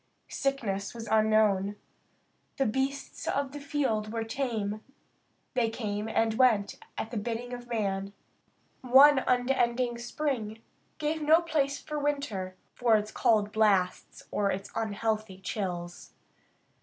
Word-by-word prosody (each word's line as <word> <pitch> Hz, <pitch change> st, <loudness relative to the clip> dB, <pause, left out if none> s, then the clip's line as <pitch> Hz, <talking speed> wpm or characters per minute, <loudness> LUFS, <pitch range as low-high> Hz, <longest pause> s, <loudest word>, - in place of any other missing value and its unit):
Sickness 225 Hz, -8 st, -2 dB
was 230 Hz, -1 st, -7 dB
unknown. 215 Hz, -2 st, +3 dB, 0.8 s
The 270 Hz, -, +2 dB
beasts 270 Hz, +5 st, -2 dB
of 280 Hz, -1 st, 0 dB
the 290 Hz, -, -7 dB
field 270 Hz, -7 st, -1 dB
were 225 Hz, 0 st, -2 dB
tame; 225 Hz, -4 st, -2 dB, 0.7 s
they 240 Hz, -4 st, +2 dB
came 215 Hz, -1 st, -3 dB
and 225 Hz, 0 st, +1 dB
went 220 Hz, -4 st, +3 dB, 0.2 s
at 225 Hz, -, -4 dB
the 240 Hz, -, -3 dB
bidding 235 Hz, +3 st, -3 dB
of 245 Hz, 0 st, -7 dB
man. 200 Hz, -4 st, -2 dB, 0.7 s
One 265 Hz, +2 st, +7 dB
unending 245 Hz, -1 st, +1 dB
spring 235 Hz, -4 st, -3 dB, 0.3 s
gave 310 Hz, +1 st, -1 dB
no 315 Hz, +3 st, +5 dB
place 290 Hz, -4 st, 0 dB
for 300 Hz, -1 st, -4 dB
winter 280 Hz, -11 st, -2 dB, 0.2 s
for 235 Hz, -2 st, +3 dB
its 210 Hz, 0 st, -4 dB
cold 215 Hz, -4 st, +2 dB
blasts 205 Hz, -4 st, +1 dB
or 200 Hz, -1 st, +1 dB
its 195 Hz, +1 st, -3 dB
unhealthy 215 Hz, -2 st, -2 dB
chills. 175 Hz, -4 st, -5 dB
225 Hz, 125 wpm, -29 LUFS, 210-265 Hz, 0.8 s, One